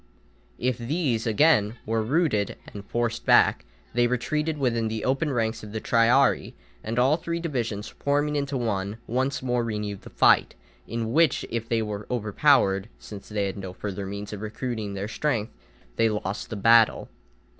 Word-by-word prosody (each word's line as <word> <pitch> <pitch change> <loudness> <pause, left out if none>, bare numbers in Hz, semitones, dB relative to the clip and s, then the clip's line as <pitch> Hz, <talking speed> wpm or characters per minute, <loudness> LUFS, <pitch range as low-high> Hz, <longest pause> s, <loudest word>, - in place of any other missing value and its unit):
If 125 -1 -1
these, 120 -3 -1
again, 110 -2 +3
were 115 +1 0
routed 115 - +1 0.2
and 100 - -7
forced 120 +2 -2
back, - - +4 0.3
they 120 +1 +3
retreated 150 +6 -1
within 120 -5 0
the 110 0 -3
open 135 +3 +1
ranks 115 -3 -1
of 105 -1 -10
the 110 - -2
triarii, 120 +5 +3 0.3
and 115 +2 -4
all 130 +5 +4
three 170 0 -3
divisions, 115 -10 -3
forming 145 +4 -1
into 140 -1 -1
one, 105 -3 -2
once 130 +3 -1
more 125 -1 0
renewed 105 -3 -4
the - - -12
fight, - - +4 0.3
in 115 0 -3
which, 165 -2 +3
if 115 -1 -3
they 115 -1 +1
were 105 -1 -5
overpowered, 105 -3 +2
since 100 -2 -11
they 105 -2 -1
had 95 - -4
no 95 -2 -6
further 100 0 -5
means 100 +1 -6
of 105 - -6
recruiting 110 -1 -4
their 100 +1 -3
strength, 115 -2 -2 0.4
they 115 - +3
lost 105 -2 -4
the - - -4
battle. 115 +2 +4
115 Hz, 165 wpm, -25 LUFS, 105-130 Hz, 0.4 s, back